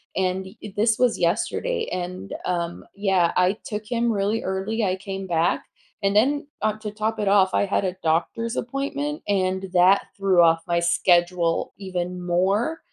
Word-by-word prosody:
and 190 0 0 0.2
y 205 - -8
this 225 +2 +2
was 250 -2 +2
yesterday 455 - 0
and, 185 +2 -5
um, 170 -1 -2
yeah, 190 -4 +2
I 185 +3 +3
took 210 0 -5
him 235 0 0
really 205 +2 0
early, 195 +4 -2
I 185 -1 +1
came 195 -1 -6
back 170 0 +1 0.4
and 200 +1 +1
then, 285 +6 +2 0.2
uh, 215 - +2
to 215 - -5
top 215 +1 -2
it 205 - -1
off, 195 -1 +4
I - - +2
had 195 0 0
a 185 0 -2
doctor's 180 +9 0
appointment 280 +4 -3
and 190 -1 0
that 185 +2 +5 0.2
threw 190 -3 +4
off 165 0 +4
my 170 0 +2
schedule 175 0 +2
even 180 -2 -4
more, 195 - +1
195 Hz, 165 wpm, -24 LUFS, 180-220 Hz, 0.4 s, that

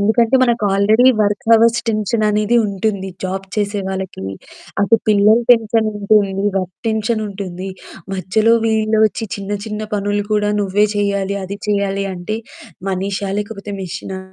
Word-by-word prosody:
ఎందుకంటే 225 +4 +3
మనకు 235 -3 +2
already 215 +6 +4
work 205 -1 0
hours 230 +1 +5
టెన్షననేది 215 +1 +1
ఉంటుంది 200 -1 -2 0.2
జాబ్ 190 +1 -3
చేసే 205 -1 -1
వాళ్ళకి. 190 - -5 0.6
అటు 215 +3 +4
పిల్లల 210 +1 +5
టెన్షన్ 225 -2 +4
ఉంటుంది, 200 -1 +2 0.2
వర్క్ 185 -1 -2
టెన్షన్ 220 0 0
ఉంటుంది. 190 -2 -6 0.5
మధ్యలో 215 +5 +2
వీళ్ళ 220 -1 +1
ఒచ్చి 225 +1 -5
చిన్న, 200 +1 -4
చిన్న 210 0 -4
పనులు 205 0 -1
కూడా 210 0 +1
నువ్వే 200 +2 +2
చేయాలి, 200 -1 0
అది 200 +2 -6
చేయాలి 200 -1 0
అంటే 180 +5 -4 0.5
మనిషా 195 +1 -2
లేకపోతే 205 -1 -7
మెషినా 190 +1 -6
205 Hz, 135 wpm, -18 LUFS, 195-220 Hz, 0.6 s, hours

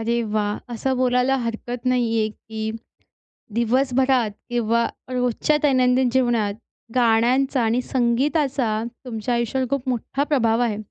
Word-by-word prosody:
अरे 235 +1 0
वाह! 210 -1 0 0.2
असं 260 +3 -1
बोलायला 250 +1 +2
हरकत 240 +1 -4
नाही 240 -3 +2
आहे 215 - +1
की 220 0 -6 0.8
दिवसभरात 255 0 +2 0.2
किंवा 235 -1 +1 0.2
रोजच्या 250 +3 +1
दैनंदिन 255 -2 +3
जीवनात 235 -6 +1 0.4
गाण्यांचा 250 +2 +3
आणि 230 +2 +1
संगीताचा, 255 -2 0 0.2
तुमच्या 240 0 -3
आयुष्यावर 235 +2 0
खूप 275 -2 -2
मोठा 255 +3 -1
प्रभाव 240 -6 +2
आहे 230 -4 +1
245 Hz, 120 wpm, -22 LUFS, 230-260 Hz, 0.8 s, दैनंदिन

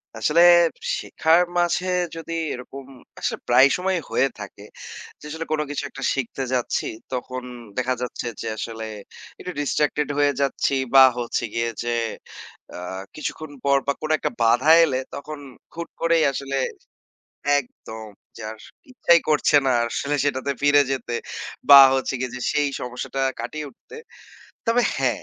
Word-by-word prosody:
আসলে 150 +9 +2 0.6
শেখার 165 +2 +2 0.2
মাঝে 175 +1 +1 0.3
যদি 165 0 -6 0.2
এরকম 130 +2 -9 0.3
আসলে - - -2
প্রায় 135 - +7
সময়ই 185 -1 -1
হয়ে 135 - +3
থাকে। 105 0 -9 0.6
যে - - -12
আসলে 160 +2 -5
কোন 155 -1 +1
কিছু 145 0 -3
একটা 135 - -9
শিখতে 135 0 -3
যাচ্ছি, 125 -2 -1 0.3
তখন 130 0 -4 0.3
দেখা 130 0 +1
যাচ্ছে, 125 -1 -4
যে - - -5
আসলে 110 0 -5 0.5
একটু 180 - -6
ডিসট্রাক্টেড 150 +1 0
হয়ে 145 0 +3
যাচ্ছি 140 0 0 0.2
বা 135 -1 +10 0.2
হচ্ছে 120 0 -2
গিয়ে 115 0 0
যে 120 - -3 0.9
আ - - -7 0.4
কিছুক্ষণ 155 0 -5
পর 140 0 +4
বা 140 - +2
কোন 155 - -4
একটা - - -2
বাধা 120 +6 +4
এলে 135 -4 -1 0.2
তখন 155 +1 -7 0.3
হুট 170 0 -6
করেই 165 -1 +3
আসলে 135 0 -3 1.0
একদম 110 -4 -10 0.3
যে - - -10
আর 110 - -11 0.3
ইচ্ছাই 170 -9 +4
করছে 150 -1 +3
না। 130 - +3 0.2
আসলে 140 +5 -2
সেটাতে 140 -1 -1
ফিরে 145 0 +5
যেতে 125 -3 -3 0.6
বা 140 -1 +12 0.2
হচ্ছে 135 0 -1
গিয়ে 130 -1 -3
যে 125 - -7
সেই 145 -1 +1
সমস্যাটা 125 +2 -4 0.2
কাটিয়ে 155 -1 -5
উঠতে 130 - -16 0.7
তবে 235 +2 +3
হ্যাঁ, 125 -5 0
140 Hz, 150 wpm, -23 LUFS, 125-155 Hz, 1.0 s, বা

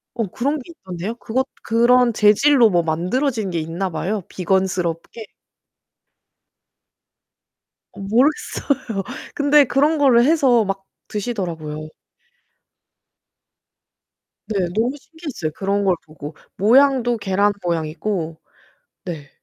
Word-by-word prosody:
어 230 -2 -1
그런 280 +10 -1
게 265 - -11
있던데요. 190 - -6
그것 260 +3 -2 0.2
그런 240 +1 +4
재질로 225 +4 +5
뭐 175 -2 +2
만들어진 200 - -1
게 170 - -1
있나 170 +4 -3
봐요. 185 +4 -3
비건스럽게. 185 +2 -2 2.7
어 - - -13
모르겠어요. 240 - 0 0.3
근데 290 0 +5
그런 290 +5 +2
거를 250 -5 +5
해서 265 -6 +4
막 195 0 -3 0.2
드시더라고요. 165 -8 -4 2.6
네. 195 -5 -1
너무 240 +6 0
신기했어요. 290 - -6
그런 200 +1 -1
걸 185 -2 +3
보고 155 -1 -10 0.2
모양도 245 +2 +4
계란 205 0 +1
모양이고. 165 0 -2 0.7
네. 155 -5 -7
210 Hz, 230 characters per minute, -20 LUFS, 175-250 Hz, 2.7 s, 재질로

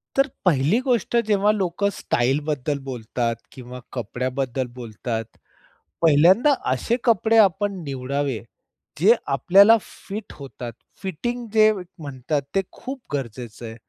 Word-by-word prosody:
तर 275 +1 +4 0.2
पहिली 160 - +3
गोष्ट 240 -3 0
जेव्हा 210 -1 +3
लोकं 200 -1 0
स्टाईलबद्दल 145 +2 -1
बोलतात 120 -2 -2 0.2
किंवा 125 -1 -9
कपड्याबद्दल 130 +2 -2
बोलतात. 115 -1 -4 0.8
पहिल्यांदा 175 - +5 0.2
असे 130 - 0
कपडे 225 0 +3
आपण 205 -1 +4
निवडावे, 135 -2 -2 0.6
जे 210 +8 +6 0.2
आपल्याला 195 - +6
फिट 205 +3 -9
होतात. 130 -4 -8 0.3
फिटिंग 235 +7 -4
जे 215 -1 +6 0.3
म्हणतात, 140 0 -3
ते 195 - +4
खूप 265 +1 -7
गरजेचं 120 -3 -5
आहे. 110 0 -7
145 Hz, 110 wpm, -23 LUFS, 125-205 Hz, 0.8 s, जे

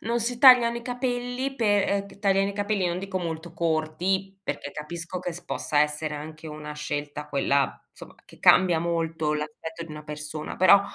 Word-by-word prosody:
non 235 +2 -1
si 240 +1 -2
tagliano 240 -3 +7
i - - -9
capelli 245 +1 -2
pe 205 -5 +2 0.2
uhm, 200 - -10
che 200 - -15
tagliano 195 -1 +2
i 200 - -5
capelli, 205 -2 0
non 175 0 -1
dico 190 0 -3
molto 165 -1 -5
corti, 170 +4 -1
perché 145 - -4
capisco 170 +4 -6
che 175 -1 -4
s 175 +1 -10
possa 150 -3 0
essere 150 +1 0
anche 155 +2 -8
una 150 0 -7
scelta 150 0 -5
quella, 140 -1 +1
insomma, - - -13
che - - -17
cambia 180 -3 +6
molto 165 -2 -1
l'aspetto 155 +2 -5
di 165 - -12
una 150 0 -8
persona, 150 0 -6
però, 185 +2 +7
170 Hz, 185 wpm, -26 LUFS, 150-200 Hz, 0.2 s, tagliano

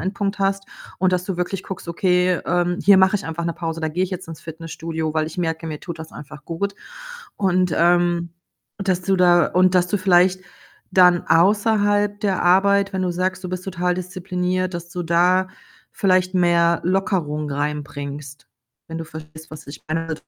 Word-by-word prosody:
Endpunkt 200 +2 -2
hast 195 0 0 0.3
und 185 -1 +2
dass 180 0 -1
du 190 -2 -4
wirklich 180 +2 -3
guckst: 190 -2 -8
„Okay, 180 +1 +2
ähm, 175 +1 0
hier 200 -2 +7
mache 190 +2 +4
ich 205 - -7
einfach 165 +1 -4
'ne 170 - -1
Pause, 165 -1 -4
da 160 - -1
gehe 175 +4 0
ich 185 - -7
jetzt 185 -2 -6
ins 165 - -9
Fitnessstudio, 160 -1 -5
weil 155 -1 +1
ich 160 - -8
merke, 165 -1 -2
mir 155 -2 -6
tut 170 -2 -7
das 160 0 -9
einfach 150 +1 -11
gut.” 200 +5 -3 0.6
Und, 185 -3 +1
ähm, 175 0 +2 0.5
dass 190 -3 -1
du 195 +1 +1
da 175 -2 +5
und 185 +1 +2
dass 180 -1 +3
du 205 - 0
vielleicht 185 0 +3 0.5
dann 180 -2 +4
außerhalb 205 +3 +2
der 200 -3 0
Arbeit 200 +2 +3
wenn 190 -1 -2
du 180 - 0
sagst, 185 +1 -2
du - - -3
bist 185 0 -5
total 180 -1 -1
diszipliniert, 185 0 -3
dass 170 0 -6
du 180 - -4
da 180 +3 +2 0.4
vielleicht 185 -1 +1
mehr 170 -1 +3
Lockerung 170 -5 -1
reinbringst, 145 -1 -5 0.4
wenn 165 0 -5
du 165 - -5
verstehst, 155 0 -11
was 155 -1 -10
ich 140 - -10
meine 165 0 -2
180 Hz, 185 wpm, -21 LUFS, 165-185 Hz, 0.6 s, hier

